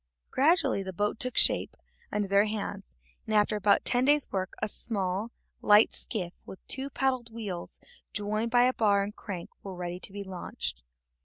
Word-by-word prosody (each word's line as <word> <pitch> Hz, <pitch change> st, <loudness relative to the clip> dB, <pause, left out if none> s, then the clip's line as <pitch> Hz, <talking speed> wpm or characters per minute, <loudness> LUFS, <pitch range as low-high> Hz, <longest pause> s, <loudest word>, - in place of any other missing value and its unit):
Gradually 300 Hz, -, +3 dB
the 190 Hz, -1 st, -5 dB
boat 210 Hz, +4 st, -1 dB
took 255 Hz, -2 st, -1 dB
shape -, -, +3 dB, 0.3 s
under 205 Hz, -1 st, 0 dB
their 200 Hz, +1 st, +4 dB
hands, 210 Hz, -, -4 dB, 0.4 s
and 215 Hz, -, 0 dB
after 210 Hz, +1 st, +3 dB
about 205 Hz, -1 st, +3 dB
ten 245 Hz, +1 st, +3 dB
days' 290 Hz, +1 st, +3 dB
work 190 Hz, -1 st, -2 dB
a 215 Hz, -, 0 dB
small, 200 Hz, -1 st, -3 dB, 0.3 s
light 210 Hz, +1 st, +6 dB
skiff, 180 Hz, -5 st, -4 dB
with 190 Hz, -, -10 dB
two 270 Hz, +1 st, -2 dB
paddle 260 Hz, -2 st, 0 dB
wheels 210 Hz, -6 st, -6 dB, 0.3 s
joined 215 Hz, +2 st, -1 dB
by 245 Hz, +1 st, +5 dB
a 255 Hz, +1 st, +3 dB
bar 205 Hz, -5 st, +3 dB
and 205 Hz, +1 st, -6 dB
crank, 180 Hz, -4 st, -7 dB
was 190 Hz, -2 st, -7 dB
ready 175 Hz, 0 st, -4 dB
to 190 Hz, -, -3 dB
be 200 Hz, 0 st, -5 dB
launched. 180 Hz, -, -5 dB
210 Hz, 175 wpm, -29 LUFS, 195-235 Hz, 0.4 s, light